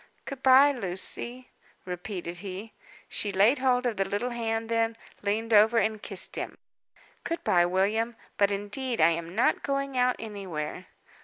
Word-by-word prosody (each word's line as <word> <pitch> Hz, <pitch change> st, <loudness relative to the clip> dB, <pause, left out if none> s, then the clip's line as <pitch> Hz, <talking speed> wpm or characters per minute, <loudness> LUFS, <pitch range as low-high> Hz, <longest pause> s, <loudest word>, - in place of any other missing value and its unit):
"Good 275 Hz, -1 st, -7 dB
bye, 265 Hz, +2 st, +7 dB
Lucy," 240 Hz, +3 st, -3 dB, 0.3 s
repeated 180 Hz, -1 st, -5 dB
he. 200 Hz, +3 st, -7 dB, 0.3 s
She 205 Hz, -, 0 dB
laid 210 Hz, +8 st, +4 dB
hold 255 Hz, -1 st, +2 dB
of 235 Hz, -3 st, -1 dB
the 195 Hz, -, +2 dB
little 225 Hz, +5 st, -1 dB
hand 225 Hz, -1 st, -2 dB
then, 230 Hz, 0 st, 0 dB, 0.2 s
leaned 220 Hz, +3 st, -1 dB
over, 220 Hz, +2 st, +6 dB
and 220 Hz, -1 st, +1 dB
kissed 190 Hz, -2 st, -1 dB
him. -, -, -5 dB, 0.7 s
"Good 335 Hz, -, -3 dB
bye, 175 Hz, -1 st, +3 dB
William; 210 Hz, +6 st, 0 dB, 0.2 s
but 200 Hz, -1 st, +3 dB
indeed 205 Hz, +5 st, -3 dB
I 160 Hz, -, +6 dB
am 170 Hz, +1 st, -3 dB
not 230 Hz, -, +2 dB
going 275 Hz, -2 st, -2 dB
out 250 Hz, 0 st, +3 dB
anywhere." 185 Hz, -6 st, -6 dB
220 Hz, 155 wpm, -28 LUFS, 190-245 Hz, 0.7 s, bye